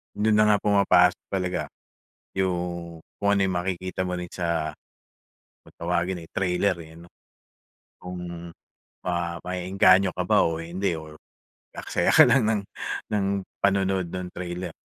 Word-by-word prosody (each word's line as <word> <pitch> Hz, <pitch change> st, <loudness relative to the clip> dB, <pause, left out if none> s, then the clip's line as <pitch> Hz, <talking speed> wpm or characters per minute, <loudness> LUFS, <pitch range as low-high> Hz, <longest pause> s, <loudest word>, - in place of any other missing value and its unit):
Dun 110 Hz, +1 st, +2 dB
na 105 Hz, -, +5 dB
nga 105 Hz, -, +5 dB
pumapasok 95 Hz, -3 st, +4 dB
talaga 90 Hz, -2 st, -2 dB, 0.7 s
yung 85 Hz, -3 st, -2 dB, 0.2 s
kung 100 Hz, -, +3 dB
ano 100 Hz, -1 st, +3 dB
yung 95 Hz, -, -1 dB
makikita 95 Hz, +1 st, -2 dB
mo 90 Hz, -1 st, -2 dB
rin 90 Hz, -, -5 dB
sa 85 Hz, -3 st, -2 dB, 0.9 s
kung -, -, -18 dB
tawagin 90 Hz, +1 st, -1 dB
ay 80 Hz, -, -12 dB
trailer, 90 Hz, 0 st, 0 dB
eh, 80 Hz, -, -14 dB
ano. 85 Hz, -, -14 dB, 0.9 s
Kung 85 Hz, -1 st, -7 dB, 0.5 s
ma 85 Hz, -2 st, -2 dB
ma-e-engganyo 95 Hz, +1 st, +3 dB
ka -, -, -1 dB
ba -, -, +3 dB
o 80 Hz, 0 st, -2 dB
hindi 90 Hz, +2 st, -2 dB
or 80 Hz, -1 st, -9 dB, 0.5 s
mag-aaksaya -, -, 0 dB
ka -, -, +8 dB
lang 135 Hz, -4 st, +4 dB
ng 105 Hz, -2 st, +1 dB, 0.5 s
ng 105 Hz, -, -1 dB
ng 100 Hz, -1 st, +1 dB, 0.4 s
panonood 95 Hz, -3 st, +1 dB
nung 90 Hz, -1 st, -4 dB
trailer. 90 Hz, 0 st, -5 dB
90 Hz, 145 wpm, -25 LUFS, 85-95 Hz, 0.9 s, ka